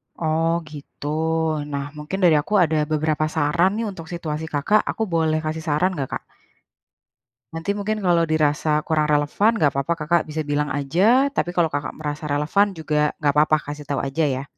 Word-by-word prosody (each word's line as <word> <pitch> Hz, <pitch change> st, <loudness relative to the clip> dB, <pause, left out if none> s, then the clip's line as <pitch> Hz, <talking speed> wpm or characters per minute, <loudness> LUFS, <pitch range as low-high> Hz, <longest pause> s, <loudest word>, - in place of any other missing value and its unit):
Oh, 160 Hz, 0 st, 0 dB, 0.2 s
gitu? 145 Hz, -1 st, -9 dB, 0.6 s
Nah, 140 Hz, -1 st, -2 dB
mungkin 150 Hz, +6 st, -4 dB
dari 170 Hz, -3 st, +6 dB
aku 210 Hz, -, -6 dB
ada 160 Hz, -1 st, +1 dB
beberapa 155 Hz, 0 st, +1 dB
saran 170 Hz, +5 st, +2 dB
nih, 230 Hz, -, -1 dB
untuk 165 Hz, -4 st, -9 dB
situasi 160 Hz, -2 st, -4 dB
Kakak, 180 Hz, +9 st, +3 dB
aku 225 Hz, -, -1 dB
boleh 160 Hz, -1 st, +2 dB
kasih 160 Hz, +1 st, -3 dB
saran 160 Hz, +5 st, +2 dB
nggak, 135 Hz, -4 st, -3 dB
Kak? -, -, -6 dB, 1.3 s
Nanti 165 Hz, +4 st, -2 dB
mungkin 205 Hz, +1 st, -2 dB
kalau 170 Hz, -2 st, +3 dB
dirasa 150 Hz, 0 st, +1 dB
kurang 155 Hz, -2 st, +1 dB
relevan 150 Hz, +10 st, +2 dB
nggak 150 Hz, -10 st, +2 dB
papa 140 Hz, +5 st, -1 dB
Kakak 165 Hz, +2 st, +1 dB
bisa 155 Hz, 0 st, -3 dB
bilang 145 Hz, 0 st, -1 dB
aja, 190 Hz, -, +2 dB
tapi 175 Hz, -9 st, -2 dB
kalau 165 Hz, -3 st, +2 dB
Kakak 145 Hz, 0 st, -3 dB
merasa 150 Hz, 0 st, -5 dB
relevan 155 Hz, +8 st, +1 dB
juga 150 Hz, -2 st, 0 dB
nggak 145 Hz, -1 st, +2 dB
papa, 155 Hz, +1 st, +4 dB, 0.2 s
kasih 145 Hz, -1 st, -9 dB
tahu 140 Hz, -2 st, -2 dB
aja 140 Hz, +4 st, -1 dB
ya. 135 Hz, -1 st, -2 dB
155 Hz, 175 wpm, -22 LUFS, 150-170 Hz, 1.3 s, dari